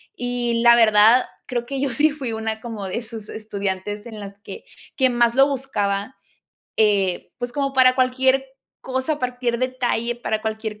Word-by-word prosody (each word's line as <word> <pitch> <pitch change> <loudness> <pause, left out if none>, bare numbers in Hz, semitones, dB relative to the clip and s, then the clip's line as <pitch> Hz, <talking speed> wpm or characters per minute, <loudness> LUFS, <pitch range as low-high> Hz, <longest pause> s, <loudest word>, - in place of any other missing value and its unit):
Y 240 -1 -1
la 235 0 +8
verdad, 225 +2 +6 0.2
creo 240 -1 -2
que 270 +1 -4
yo 280 - +1
sí 300 +6 +3
fui 275 -5 -4
una 220 0 -3
como 220 -5 -6
de 210 +6 -3
sus 220 -2 -10
estudiantes 205 -1 -4
en 220 -2 -9
las 200 -1 -9
que - - -10 0.3
que 260 -2 +4
más 240 -1 +2
lo 270 +1 +6
buscaba, 245 -5 -2 0.6
eh, 200 -4 +1
pues, 245 0 -4
como 275 -1 -1
para 255 -1 +6
cualquier 260 +1 +2 0.4
cosa, 260 +4 -2
partir 245 -1 -2
detalle, 245 -2 -1
para 220 -2 -2
cualquier 220 -1 -4
235 Hz, 165 wpm, -22 LUFS, 215-255 Hz, 0.6 s, la